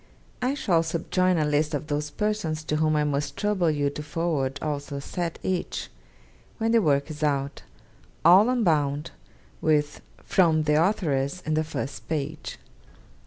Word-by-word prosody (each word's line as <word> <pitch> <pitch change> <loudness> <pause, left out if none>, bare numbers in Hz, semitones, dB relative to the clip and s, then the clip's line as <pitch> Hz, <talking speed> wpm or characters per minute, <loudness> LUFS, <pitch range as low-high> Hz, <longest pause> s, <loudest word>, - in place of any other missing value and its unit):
I 255 +3 +1
shall 180 - +2
subjoin 175 +2 +1
a 155 - +2
list 150 +1 +1
of - - -3
those 150 0 -2
persons 200 -5 -2
to 150 0 -1
whom 155 0 +2
I 150 - +2
must 145 -1 -2
trouble 205 -5 +1
you 145 -2 0
to 150 - -6
forward 150 -3 -1
also 145 -1 -4
a - - -3
set 170 +3 -4
each, 185 -2 -2 0.7
when 225 0 0
the 230 -1 +5
work 145 -3 +1
is 150 0 -8
out; 140 -2 -1 0.6
all 190 +7 +7
unbound, 155 - +1 0.5
with 150 -2 +1 0.2
"From 160 -4 +3
the 150 +1 +3
Authoress" 165 -5 0
in 155 - 0
the 155 +1 +2
first 145 -3 -6
page. 155 0 -3
155 Hz, 160 wpm, -26 LUFS, 145-175 Hz, 0.7 s, all